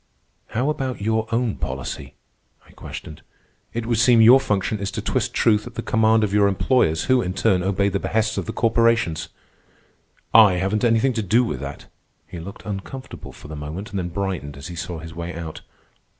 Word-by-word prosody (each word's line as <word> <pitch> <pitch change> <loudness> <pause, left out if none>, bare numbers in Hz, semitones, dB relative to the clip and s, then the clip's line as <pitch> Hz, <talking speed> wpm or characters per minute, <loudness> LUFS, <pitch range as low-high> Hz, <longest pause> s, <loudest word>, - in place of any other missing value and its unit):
"How 130 +7 0
about 135 -4 -3
your 110 +2 0
own 115 -1 0
policy?" 65 0 -5 0.5
I - - -18
questioned. 75 +1 -9 0.5
"It 115 -1 -4
would 115 -2 0
seem 120 -1 +5
your 120 +4 +8
function 105 -2 -1
is 100 0 -2
to - - -3
twist - - -1
truth 105 -2 +2
at - - -11
the - - -4
command 110 0 +3
of 100 -2 -1
your 105 -1 +4
employers, 100 -5 +2
who, 130 -1 +3
in 90 0 -3
turn, 90 -1 +2
obey 100 +2 +1
the 100 0 -1
behests 110 +1 0
of - - -5
the - - -2
corporations." 115 -8 +1 1.0
"I 110 -4 +8
haven't 95 +5 -1
anything 120 +2 +3
to 115 - -1
do 110 +5 +3
with 75 - -3
that." 70 +1 -7 0.4
He 85 - -9
looked 95 +4 -10
uncomfortable 105 +6 -7
for - - -13
the 75 - -7
moment, 80 +8 -6
then 95 -3 -3
brightened 90 -6 -4
as 70 +4 -8
he 85 - -7
saw 85 0 -5
his 80 0 -9
way 85 +1 -6
out. 80 -2 -7
100 Hz, 195 wpm, -22 LUFS, 85-115 Hz, 1.0 s, your